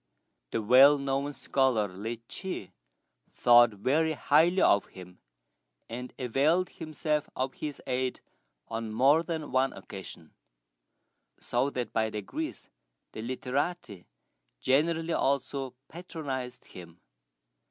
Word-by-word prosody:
The 110 - -2
well 135 +6 +7
known 140 +1 -1
scholar, 130 -6 +1
Li 110 +5 -6
Chih, 185 - -6 0.6
thought 120 0 +7
very 150 +10 +1
highly 160 +5 +3
of 100 - +4
him, 90 -1 -13 0.7
and 125 +2 -6
availed 145 +9 +1
himself 155 -2 -3
of 130 +1 -2
his 150 -2 -6
aid 130 0 -1 0.5
on 115 -1 -4
more 135 +8 +4
than 160 -3 -4
one 130 +1 +2
occasion; 90 -5 -10 1.1
so 125 +3 0
that 125 -3 -4
by 110 -1 +1
degrees 105 -2 -5 0.4
the 110 - -7
literati 130 - -3 0.5
generally 160 +5 +1
also 135 -2 -1
patronized 140 -8 -6
him. 85 -1 -13
130 Hz, 110 wpm, -29 LUFS, 115-150 Hz, 1.1 s, well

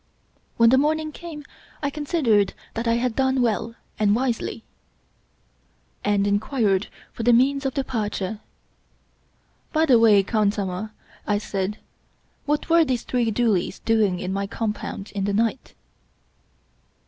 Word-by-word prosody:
When 230 0 +6
the 260 - +5
morning 310 +2 0
came, 305 -2 -9 0.4
I 285 - 0
considered 275 - +1 0.2
that 230 +1 -3
I 230 - +3
had 235 -1 -1
done 265 0 +1
well 230 -1 0 0.2
and 210 -1 +3
wisely, 235 -2 -2 1.4
and 205 -1 +2
inquired 205 -1 +1 0.3
for - - -6
the 240 +2 +4
means 270 +3 +3
of 265 - -5
departure. 215 -6 -2 0.7
" - - -40
By 315 0 +3
the 255 -6 +5
way, 210 -3 +6
khansamah/' 205 -1 -1 0.4
I 205 - +2
said, 200 0 -3 0.3
" - - -41
what 295 +1 0
were 335 0 +5
those 255 -5 -1
three 245 -2 0
doolies 215 -5 0
doing 215 -5 +1
in 185 +1 -3
my 200 0 -2
compound 210 -1 -4
in 195 -1 -2
the 200 - -1
night 230 +4 -1
230 Hz, 140 wpm, -23 LUFS, 205-265 Hz, 1.4 s, When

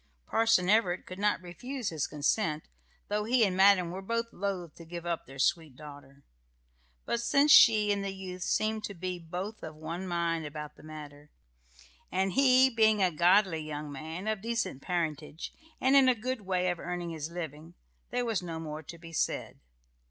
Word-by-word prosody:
Parson 225 -5 +3
Everett 190 -3 +2
could 185 +1 -9
not 205 -2 +1
refuse 245 +8 -5
his 155 -4 -2
consent, 150 +1 -1 0.4
though 210 +1 -1
he 235 0 +4
and 185 -2 -1
madam 190 -2 +5
were 190 +2 -5
both 230 +3 -2
loth 180 -5 -3
to 170 - -10
give 170 +1 -8
up 170 -1 -3
their 135 - -11
sweet 160 -1 0
daughter. 140 -1 -13 0.8
But 235 - -1
since 280 +5 +3
she 215 -5 +7
and 200 -1 0
the 195 - -2
youth 190 -1 -7
seemed 215 +3 0
to 200 - -7
be 180 +1 -4
both 180 +6 -6
of 155 -1 -8
one 165 +4 -5
mind 170 -2 -1
about 150 0 -7
the - - -16
matter, 150 -1 -10 0.8
and 190 +1 +1
he 260 -1 +6
being 220 -4 +3
a 180 - +3
godly 175 +1 +4
young 150 -1 -6
man, 160 +7 -6
of 215 -2 -1
decent 225 - -2
parentage, 160 -3 -3 0.3
and 265 +2 +3
in 270 -2 +7
a 255 - +4
good 245 +2 -3
way 185 -1 +1
of 175 - -5
earning 175 -1 -4
his 155 -1 -5
living, 165 -1 -7 0.3
there 245 0 -1
was 225 -5 0
no 165 -2 -5
more 155 -1 -6
to 170 +2 -10
be 165 0 -12
said. - - -2
180 Hz, 185 wpm, -30 LUFS, 160-215 Hz, 0.8 s, she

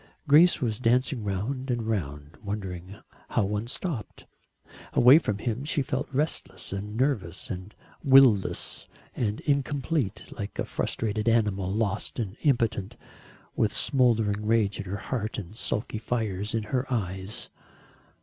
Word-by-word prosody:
Grace 160 +4 +6
was 110 -3 -1
dancing 125 0 +2
round 115 +7 -3
and 120 -2 0
round, 75 -9 -3
wondering 95 -3 -5 0.3
how 115 - +2
one 105 +3 -2
stopped. 135 - -4 0.7
Away 125 +6 +8
from 105 -10 -2
him 115 +4 -2
she 145 -1 0
felt 130 +1 -2
restless 145 -6 -2
and 105 +2 -5
nervous 115 - -1
and 95 +3 -7 0.3
will 135 -4 +8
less 95 - -5 0.3
and 105 -3 -1
incomplete, 140 - -1
like 100 0 -6
a - - -1
frustrated 110 0 -1
animal 105 -5 +1
lost 105 0 -1
and 105 -5 -3
impotent, 115 - +1 0.6
with - - +2
smouldering 110 -5 +2
rage 105 -2 +2
in 105 - -4
her 100 +2 -3
heart 110 0 -3
and 100 0 -7
sulky 110 0 -2
fires 110 -3 -2
in 110 - 0
her 130 +1 0
eyes. 95 -3 -3
110 Hz, 140 wpm, -27 LUFS, 100-130 Hz, 0.7 s, Away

